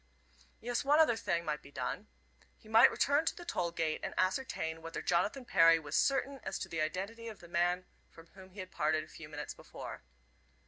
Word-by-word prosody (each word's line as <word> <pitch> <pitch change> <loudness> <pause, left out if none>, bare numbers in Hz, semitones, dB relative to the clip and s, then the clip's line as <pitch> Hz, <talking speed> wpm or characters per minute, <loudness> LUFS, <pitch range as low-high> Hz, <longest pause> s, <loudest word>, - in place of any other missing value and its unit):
Yes, 245 +3 -1
one 290 +2 +4
other 310 -7 +5
thing 170 -6 -1
might 150 -1 -2
be - - -14
done. 125 -3 -4 0.5
He - - -19
might 225 +1 +8
return 285 +3 +2
to - - 0
the 345 - -10
toll 180 - -1
gate 165 -2 -1
and - - -5
ascertain 185 -5 -1
whether 165 0 -5
Jonathan 205 +9 0
Perry 165 -6 +6
was 150 -1 -5
certain 275 +5 +2
as - - -3
to - - -5
the 160 - -3
identity 200 +9 -3
of 220 -3 -8
the 175 - -13
man 175 +1 +1 0.2
from 165 - -15
whom 190 -1 -13
he 190 +1 -8
had 185 0 -9
parted 155 +1 +1
a - - -13
few 160 -1 -11
minutes 150 -1 -6
before. - - -9
180 Hz, 210 wpm, -33 LUFS, 160-230 Hz, 0.5 s, might